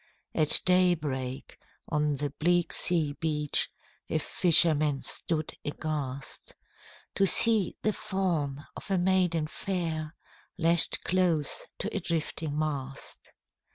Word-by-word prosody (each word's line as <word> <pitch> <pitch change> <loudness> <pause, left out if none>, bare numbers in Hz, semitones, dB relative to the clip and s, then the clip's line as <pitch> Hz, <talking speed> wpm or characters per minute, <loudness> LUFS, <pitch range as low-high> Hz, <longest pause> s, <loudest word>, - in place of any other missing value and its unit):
At 155 -1 +7
day 180 -1 +4
break, 130 -3 -6 0.3
on 150 -2 0
the 145 0 -4
bleak 175 +3 0
sea 160 -5 +4
beach 150 -2 +1 0.4
A - - 0
fisherman 155 -5 +2
stood 155 -2 -4
aghast, 145 -3 -6 0.6
To 195 - +2
see 220 -2 +4
the 215 - +1
form 180 -10 -2
of - - -10
a 195 - +1
maiden 180 -3 +1
fair 160 -2 -4 0.4
Lashed 170 -1 +2
close 175 -5 0
to 215 - -4
a - - 0
drifting 160 -3 -3
mast. 140 -3 -5
160 Hz, 115 wpm, -28 LUFS, 150-180 Hz, 0.6 s, At